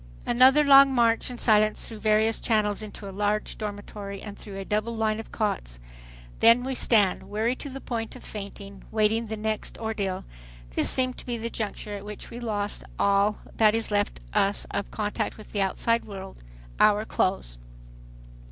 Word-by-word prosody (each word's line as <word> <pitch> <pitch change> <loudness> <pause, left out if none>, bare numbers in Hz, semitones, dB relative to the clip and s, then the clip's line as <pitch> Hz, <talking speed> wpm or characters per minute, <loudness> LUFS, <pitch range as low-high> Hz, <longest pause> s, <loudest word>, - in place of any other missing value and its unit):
Another 260 +5 +6
long 275 -1 +8
march 230 -1 +3
in 250 - -7
silence 215 -2 +2
through 220 -2 -8
various 215 +1 +2
channels 210 -3 +1
into 210 -1 -7
a - - -6
large 210 +2 -1
dormitory 205 -1 -6
and 205 0 -8
through 200 -2 -9
a 195 - -5
double 215 +3 -1
line 220 -1 0
of 225 - -9
cots! - - -2 0.6
Then 230 +2 +6
we 265 +1 -2
stand, 210 -6 +3
weary 220 +4 0
to 285 - -7
the 270 0 -7
point 225 -2 -4
of - - -12
fainting, 200 -1 -8
waiting 220 +1 +1
the 220 0 -4
next 215 0 -2
ordeal. 205 -4 -3 0.5
This - - +2
seemed 255 -1 +1
to - - -10
be 240 -1 -2
the 230 +1 -4
juncture 210 -1 -4
at 200 -1 -6
which 210 0 -9
we 235 - -7
lost 210 -3 -3
all 200 +1 +2 0.2
that 215 -1 +5
is 225 -1 -1
left 205 0 0
us 200 -1 +1
of 200 - -3
contact 210 -1 -3
with 215 - -13
the 205 - -1
outside 230 +4 +1
world,—our 190 - -1
clothes. 120 - -1
215 Hz, 175 wpm, -26 LUFS, 200-225 Hz, 0.6 s, long